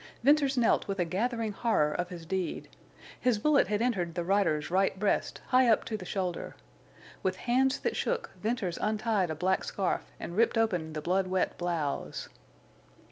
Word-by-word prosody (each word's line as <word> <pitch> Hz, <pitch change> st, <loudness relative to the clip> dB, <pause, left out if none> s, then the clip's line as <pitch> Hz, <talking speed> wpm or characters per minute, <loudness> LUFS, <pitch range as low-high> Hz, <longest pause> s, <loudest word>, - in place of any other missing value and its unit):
Venters 280 Hz, 0 st, +4 dB
knelt 235 Hz, -2 st, +3 dB
with 195 Hz, 0 st, -2 dB
a 175 Hz, -, +1 dB
gathering 225 Hz, +5 st, -1 dB
horror 195 Hz, -9 st, +1 dB
of 175 Hz, 0 st, -2 dB
his 170 Hz, -3 st, -8 dB
deed. 185 Hz, +1 st, -3 dB, 0.5 s
His 250 Hz, -3 st, +2 dB
bullet 285 Hz, +1 st, +3 dB
had 210 Hz, +3 st, 0 dB
entered 180 Hz, -9 st, -1 dB
the 175 Hz, -, -1 dB
rider's 175 Hz, -5 st, +1 dB
right 190 Hz, +1 st, +2 dB
breast, 205 Hz, +1 st, 0 dB
high 255 Hz, 0 st, +5 dB
up 225 Hz, -2 st, +3 dB
to 220 Hz, -, -3 dB
the 195 Hz, -4 st, -6 dB
shoulder. 180 Hz, -3 st, -3 dB, 0.7 s
With 185 Hz, 0 st, 0 dB
hands 260 Hz, +3 st, +3 dB
that -, -, -1 dB
shook, 485 Hz, -1 st, -1 dB
Venters 210 Hz, -6 st, -1 dB
untied 215 Hz, -3 st, +1 dB
a 155 Hz, -, -2 dB
black 185 Hz, +4 st, +1 dB
scarf 195 Hz, -3 st, -2 dB
and 170 Hz, -, -6 dB
ripped 230 Hz, +2 st, +3 dB
open 180 Hz, -8 st, 0 dB
the 155 Hz, -, -4 dB
blood 185 Hz, +3 st, +1 dB
wet 185 Hz, 0 st, 0 dB
blouse. 170 Hz, -5 st, -3 dB
195 Hz, 175 wpm, -30 LUFS, 175-230 Hz, 0.7 s, high